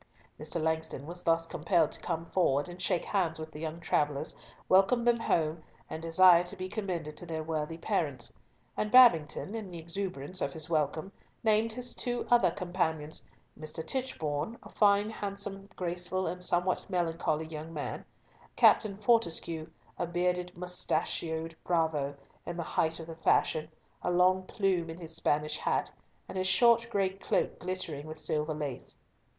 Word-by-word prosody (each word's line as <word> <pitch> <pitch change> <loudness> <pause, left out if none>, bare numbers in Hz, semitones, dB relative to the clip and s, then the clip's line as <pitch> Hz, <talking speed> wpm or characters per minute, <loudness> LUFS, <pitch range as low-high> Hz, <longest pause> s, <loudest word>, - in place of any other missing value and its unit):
Mr. 155 +3 -3
Langston 160 -3 -2
was 175 +3 -7
thus 165 0 +2
compelled 165 0 +1
to - - -3
come 165 -1 -3
forward, 175 0 0
shake 180 -2 +1
hands 175 -5 0
with 160 0 -7
the 150 - -9
young 160 +1 -4
travellers, 150 -3 0 0.3
welcome 195 +6 +4
them 240 -1 +4
home, 160 -6 0 0.3
and 160 - -4
desire 170 +1 +6
to 180 +3 -4
be 185 -1 -5
commended 180 -7 -4
to - - -6
their 160 -1 -3
worthy 160 0 -3
parents; 155 - -2 0.4
and 210 - -1
Babington, 195 -8 +6
in 220 -4 -5
the 175 - -8
exuberance 180 -1 -4
of - - -1
his 160 -2 0
welcome, 155 +4 0 0.3
named 220 0 +3
his 250 +1 -2 0.4
other 240 0 +6
two - - -8
companions—Mr. 160 -3 -4
Tichborne, 195 - -1
a - - -12
fine, 205 0 +3
handsome, 200 -1 -5
graceful, 180 +1 -2
and 180 0 -3
somewhat 180 +1 +1
melancholy 165 -3 0
young 160 0 -7
man; 150 -3 -4 0.5
Captain 200 -3 +5
Fortescue, 170 -7 +1 0.3
a 175 - 0
bearded 180 0 -1
moustached 165 -2 -1
bravo, 160 -5 0 0.3
in 175 +1 -6
the 170 - -2
height 160 +1 0
of 165 - -7
the 165 0 -9
fashion, 155 -1 +2 0.3
a - - -1
long 185 +1 +3
plume 185 -5 0
in 165 +2 -7
his 165 -2 -7
Spanish 150 +1 +1
hat, - - 0 0.3
and 190 - -4
his 185 - +1
short 235 +4 +5
gray 200 -4 +1
cloak 195 +1 -1
glittering 170 -5 -4
with 155 0 -7
silver 155 0 -1
lace. 145 -3 -6
170 Hz, 155 wpm, -30 LUFS, 160-190 Hz, 0.5 s, desire